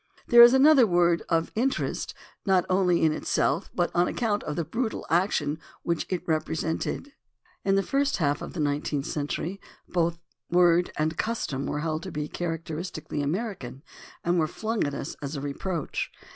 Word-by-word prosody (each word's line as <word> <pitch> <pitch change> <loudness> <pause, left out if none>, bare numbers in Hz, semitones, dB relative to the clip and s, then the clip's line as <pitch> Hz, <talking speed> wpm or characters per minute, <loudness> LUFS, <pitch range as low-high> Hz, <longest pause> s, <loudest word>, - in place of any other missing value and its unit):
There 240 0 +9
is 240 +2 +9
another 270 -3 +7
word, 175 -2 +3
of 165 -1 +1
interest 260 +5 -1 0.3
not 190 -3 +3
only 180 -3 +3
in 160 - +4
itself, 155 +2 0
but 175 -1 +1
on 175 +1 +3
account 215 -4 0
of 150 - -3
the 170 - -1
brutal 225 - -3
action 160 -4 +1 0.2
which 170 -1 -1
it 185 -2 -2
repre 160 0 0
sented. 165 - -3 0.5
In 195 0 +2
the 195 - +2
first 280 +4 +1
half 145 -4 0
of - - -7
the 175 - -6
nineteenth 145 -1 -1
century 160 +6 -3 0.3
both 170 -1 0 0.3
word 175 0 +4
and 155 +1 -1
custom 150 - -2
were 150 - -2
held 155 0 -2
to 185 - -7
be 150 -1 -3
characteristic 165 0 -4
ally 145 - -1
American, 145 - -3 0.4
and 175 +1 +2
were 155 - +2
flung 220 +6 -2
at 145 - -4
us - - -5
as 145 +1 -4
a - - -3
reproach. 150 +4 -3
170 Hz, 175 wpm, -27 LUFS, 155-195 Hz, 0.5 s, There